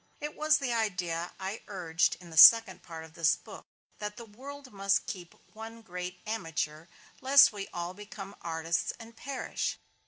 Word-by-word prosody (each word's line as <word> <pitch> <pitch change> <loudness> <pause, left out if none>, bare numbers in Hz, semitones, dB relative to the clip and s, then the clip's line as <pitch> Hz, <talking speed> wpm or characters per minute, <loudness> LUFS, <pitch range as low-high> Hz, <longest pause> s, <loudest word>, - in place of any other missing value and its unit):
It 300 0 -5
was 305 0 +3
the 260 -5 -2
idea 180 -6 -2
I 195 +3 -5
urged 175 -3 0
in 175 -2 -13
the - - -9
second 225 +3 +8
part 165 -2 -9
of 160 0 -14
this 165 -2 +3
book: - - -13 0.3
that 210 0 -5
the 235 - -8
world 265 +4 -11
must 195 0 +1
keep 175 -3 -8 0.2
one 225 +1 -10
great 180 -2 -6
amateur, 165 -7 -3 0.3
lest 275 -2 +7
we 200 -1 -6
all 175 +1 -4
become 205 0 -10
artists 165 0 -1
and 230 0 -12
perish. 265 +3 -4
195 Hz, 165 wpm, -30 LUFS, 175-230 Hz, 0.3 s, second